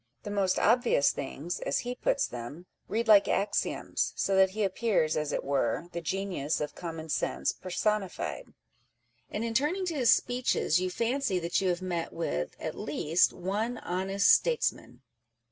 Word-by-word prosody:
The 205 Hz, -, -5 dB
most 195 Hz, -2 st, +1 dB
obvious 235 Hz, -, +3 dB
things, 145 Hz, +5 st, -5 dB
as -, -, -1 dB
he 245 Hz, -, -2 dB
puts 265 Hz, +2 st, 0 dB
them, 125 Hz, +8 st, -8 dB, 0.2 s
read 230 Hz, +2 st, -1 dB
like 210 Hz, -2 st, +7 dB
axioms 200 Hz, +1 st, -1 dB
â€" -, -, -14 dB
so 195 Hz, -, +1 dB
that 190 Hz, 0 st, +5 dB
he 210 Hz, +3 st, -2 dB
appears, 195 Hz, -5 st, +1 dB
as 150 Hz, -1 st, -1 dB
it -, -, -2 dB
were, 140 Hz, +3 st, -1 dB
the 170 Hz, -, -4 dB
genius 175 Hz, -4 st, -2 dB
of 150 Hz, -, -3 dB
common 165 Hz, -2 st, -6 dB
sense 150 Hz, -, -1 dB
personified; 195 Hz, +1 st, -2 dB, 0.8 s
and 210 Hz, -, -3 dB
in 230 Hz, -1 st, -2 dB
turning 305 Hz, +10 st, +1 dB
to 350 Hz, -, -2 dB
his 255 Hz, -5 st, +4 dB
speeches 245 Hz, -8 st, +2 dB
you 185 Hz, -, 0 dB
fancy 235 Hz, +1 st, 0 dB
that 170 Hz, +1 st, 0 dB
you 190 Hz, -, +1 dB
have 175 Hz, +1 st, -1 dB
met 175 Hz, -2 st, -3 dB
with 75 Hz, -, -3 dB
(at -, -, -4 dB
least) 165 Hz, +4 st, +1 dB
one 215 Hz, +7 st, -2 dB
honest 195 Hz, +2 st, +2 dB
statesman 475 Hz, +1 st, 0 dB
190 Hz, 165 wpm, -29 LUFS, 170-225 Hz, 0.8 s, like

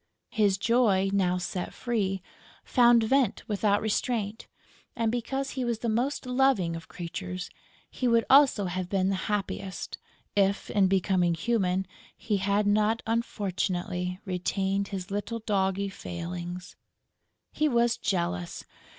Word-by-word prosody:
His 205 Hz, -3 st, +2 dB
joy, 200 Hz, -3 st, +3 dB
now 180 Hz, -2 st, +2 dB
set 180 Hz, 0 st, -4 dB
free, 195 Hz, -6 st, -1 dB, 0.4 s
found 240 Hz, -2 st, +5 dB
vent 255 Hz, -1 st, +1 dB
without 205 Hz, 0 st, +1 dB
restraint; 220 Hz, -1 st, -1 dB, 0.5 s
and, 230 Hz, -2 st, +1 dB
because 270 Hz, +3 st, -2 dB
he 260 Hz, -, -3 dB
was 235 Hz, -2 st, 0 dB
the 230 Hz, +1 st, -2 dB
most 250 Hz, +6 st, 0 dB
loving 250 Hz, -9 st, +2 dB
of 165 Hz, 0 st, -8 dB
creatures, 180 Hz, +1 st, -6 dB, 0.4 s
he 255 Hz, -, -2 dB
would 230 Hz, -1 st, +3 dB
also 270 Hz, -7 st, +6 dB
have 180 Hz, 0 st, -3 dB
been 190 Hz, -1 st, +1 dB
the 195 Hz, -, +1 dB
happiest, 195 Hz, -2 st, -3 dB, 0.4 s
if, 200 Hz, 0 st, +1 dB
in 200 Hz, -3 st, +4 dB
becoming 185 Hz, -2 st, +2 dB
human, 190 Hz, -1 st, 0 dB, 0.3 s
he 210 Hz, -3 st, -1 dB
had 200 Hz, +2 st, +1 dB
not, 215 Hz, +2 st, +2 dB
unfortunately, 185 Hz, -5 st, -2 dB
retained 195 Hz, +1 st, -1 dB
his 195 Hz, -1 st, -6 dB
little 205 Hz, +3 st, -2 dB
doggy 200 Hz, -2 st, 0 dB
failings. 175 Hz, 0 st, -6 dB, 0.8 s
He 305 Hz, 0 st, +1 dB
was 235 Hz, -2 st, +3 dB
jealous! 170 Hz, -, -2 dB
200 Hz, 130 wpm, -28 LUFS, 185-230 Hz, 0.8 s, also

